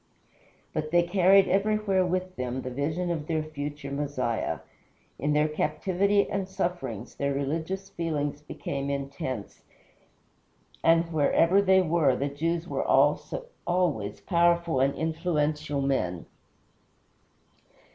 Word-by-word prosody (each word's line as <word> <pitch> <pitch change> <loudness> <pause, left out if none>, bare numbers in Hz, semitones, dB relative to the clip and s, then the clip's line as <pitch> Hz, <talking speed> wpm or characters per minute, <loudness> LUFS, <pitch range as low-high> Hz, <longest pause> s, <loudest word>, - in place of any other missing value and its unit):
But 155 - -2
they 175 +2 +4
carried 190 +2 +5
everywhere 200 0 +2
with 185 +1 -2
them 125 0 -3
the 130 - -5
vision 155 +7 -1
of 155 -3 -3
their 160 -2 0
future 145 -2 -6
Messiah. 140 -5 -2 0.6
In 145 +3 +1
their 150 +1 +3
captivity 190 +6 +1
and 195 -2 -3
sufferings 175 - -3
their 140 -1 -1
religious 160 +7 -2
feelings 150 -3 -2
became 140 -2 -4
intense, 135 -5 -4 1.2
and, 165 0 +3
wherever 165 +5 +4
they 190 -1 +4
were, 160 -6 +3
the 140 +3 -1
Jews 165 +4 -2
were - - -1
always 175 - 0
powerful 170 -4 +2
and 135 +1 +2
influential 155 -3 -1
men. 90 -11 -1
160 Hz, 115 wpm, -27 LUFS, 140-180 Hz, 1.2 s, carried